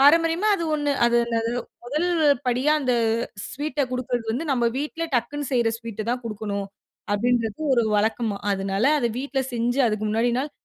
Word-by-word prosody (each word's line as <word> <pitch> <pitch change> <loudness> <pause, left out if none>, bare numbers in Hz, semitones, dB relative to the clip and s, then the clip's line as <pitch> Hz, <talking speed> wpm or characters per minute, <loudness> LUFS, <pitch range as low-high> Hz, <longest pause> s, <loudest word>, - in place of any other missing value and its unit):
பாரம்பரியமா 330 +7 +5
அது 335 - -3
1 290 -1 0 0.2
அது 240 0 +3
என்னது 230 -1 -1 0.3
1 300 +8 -1 0.4
படியா 255 +5 +2
அந்த 255 -2 +1 0.6
ஸ்வீட்ட 295 +1 -3
குடுக்கறது 250 -2 -2
வந்து 280 +8 -2
நம்ம 240 -2 +1
வீட்ல 315 +3 -3
டக்குன்னு 290 +3 -1
செய்ற 235 -2 +3
ஸ்வீட்டு 230 -2 -6
தான் 250 0 -1
குடுக்கணும் 210 -2 -3 0.5
அப்படின்றது 230 +3 0
ஒரு 235 - +3
வழக்கமா. 220 0 0 0.2
அதனால 195 +3 -1
அத 240 - +1
வீட்ல 275 0 -1
செஞ்சு 245 +3 0
அதுக்கு 215 -1 -1
முன்னாடி 230 +3 +2
நாள் 285 +3 -2
245 Hz, 160 wpm, -24 LUFS, 225-285 Hz, 0.6 s, பாரம்பரியமா